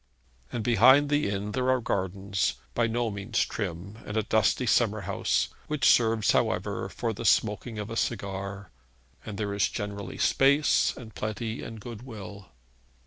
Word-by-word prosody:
And 115 - -3
behind 130 +6 +6
the 145 -5 +1
inn 100 +1 -3
there 130 +3 0
are 130 0 +3
gardens, 100 -2 -1 0.2
by 120 -1 +2
no 115 0 -1
means 105 +4 -1
trim, 95 +1 -5
and 105 - -5
a 110 - +2
dusty 110 +4 +2
summer 110 -2 +2
house, 80 -10 0 0.2
which 150 -2 +1
serves, 115 -2 +4
however, - - 0
for 115 -2 -3
the 110 - -7
smoking 110 +1 +1
of 105 +1 -5
a - - -4
cigar; 100 -3 -3 0.6
and 105 -2 -5
there 100 -1 -2
is 100 -3 +2
generally 100 -1 -5
space 140 +2 +3
and 110 -3 -10
plenty 110 +1 -4
and 115 -1 -8
goodwill. 105 -4 -9
110 Hz, 155 wpm, -27 LUFS, 100-120 Hz, 0.6 s, behind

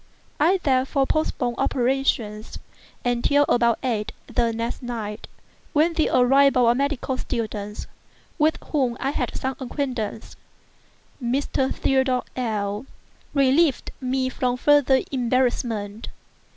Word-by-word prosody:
I 350 +6 +4
therefore 270 0 +2
postponed 255 -5 -1
operations 240 -4 0 0.5
until 245 +4 +3
about 235 -1 +3
eight 225 -5 -1
the 235 -2 0
next 230 +1 -4
night, 225 -4 -5 0.5
when 315 +3 +3
the 320 -1 +1
arrival 265 0 +5
of 235 - +6
a - - +3
medical 275 -1 -1
student 210 -3 -4 0.5
with 310 +1 +3
whom 255 -6 +1
I 275 - -1
had - - -2
some 265 -1 -3
acquaintance, 250 -5 -4 0.9
(Mr. 265 +2 0
Theodore 265 -2 +1
L—l,) 215 -1 -2 0.5
relieved 275 +2 +3
me 260 0 0
from 250 -1 -1
farther 275 -1 +4
embarrassment. 240 -5 -1
255 Hz, 110 wpm, -23 LUFS, 235-275 Hz, 0.9 s, of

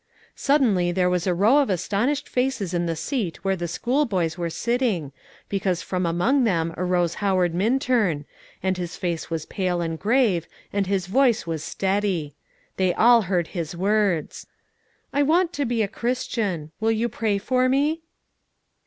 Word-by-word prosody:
suddenly 225 -12 +2
there 180 0 +1
was 180 0 0
a 180 - +3
row 220 +10 +5
of 280 - +1
astonished 220 - 0
faces 250 -8 -1
in 175 -1 0
the 165 - -1
seat 195 - -3
where 195 0 +2
the 175 -2 -4
schoolboys 195 - 0
were 170 -1 -3
sitting, 220 - -1 0.4
because 190 -3 -1
from 180 -2 -1
among 230 +12 +2
them 165 -7 +1
arose 180 -2 0
Howard 185 -4 +2
Minturn, 215 - +1 0.4
and 190 -1 0
his 175 0 -4
face 170 -3 -3
was 165 -2 -3
pale 185 -3 -1
and 165 -1 -3
grave, 210 -7 +2 0.3
and 200 -1 0
his 195 -2 0
voice 235 +2 +2
was 160 -2 -3
steady; 190 -7 -1 0.4
they 185 -2 +1
all 235 +1 +6
heard 175 -4 0
his 170 -2 -4
words: 195 -4 0 0.7
"I 285 - +2
want 335 +4 +2
to 285 -2 -1
be 235 -2 0
a - - 0
Christian: 220 -8 -2
will 220 0 +1
you 225 +1 +1
pray 220 -3 -1
for 255 +5 +1
me?" 295 +5 +1
195 Hz, 160 wpm, -24 LUFS, 175-240 Hz, 0.7 s, all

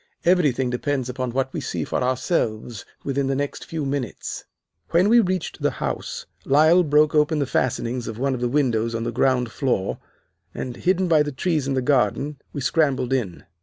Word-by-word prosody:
Everything 145 -8 +3
depends 130 0 -1
upon 130 0 -3
what 130 +2 -2
we - - -3
see - - -3
for - - -2
ourselves 125 - -1 0.2
within 140 0 -1
the 135 - 0
next 145 +1 -3
few 160 -3 -3
minutes.' 135 -5 -4 0.4
"When 180 +4 +3
we 235 +1 +7
reached 185 -5 -1
the - - +3
house, - - -4 0.2
Lyle 155 +6 +5
broke 150 -2 +3
open 150 +1 +3
the 145 - +1
fastenings 125 -1 -1
of 110 - -5
one 135 +2 0
of 125 - -4
the 120 - +1
windows 115 -5 +1
on 115 - -2
the 120 - -2
ground 125 -1 +1
floor, 120 -9 -1 0.6
and, 125 -2 -4
hidden 185 +3 +1
by 160 -3 +4
the 150 0 -1
trees 150 0 -1
in 135 - 0
the 130 - 0
garden, 135 +2 +1
we 145 - -5
scrambled 135 -2 +1
in. 110 -10 -2
135 Hz, 190 wpm, -23 LUFS, 125-150 Hz, 0.6 s, we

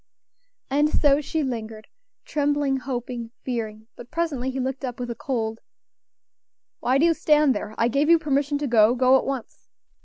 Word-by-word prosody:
And 295 +2 +3
so 290 -1 +3
she 315 +1 -2
lingered, 220 -4 -5 0.4
trembling, 290 -2 0
hoping, 245 -2 -5
fearing; 220 -3 -4
but 240 - -12
presently 305 -6 -2
he 265 0 -4
looked 265 +1 -3
up 250 -2 -4
with 245 -1 -4
a - - -5
cold 225 -3 -3 1.2
"Why 255 +2 +2
do 305 - +4
you 335 - +4
stand 300 -3 +3
there? 215 - -5
I 230 - +3
gave 280 +5 +1
you 335 - +7
permission 290 -2 0
to 290 0 -2
go; 230 -1 +4
go 255 +1 +5
at 265 - +2
once." 270 -4 -6
265 Hz, 175 wpm, -24 LUFS, 240-290 Hz, 1.2 s, you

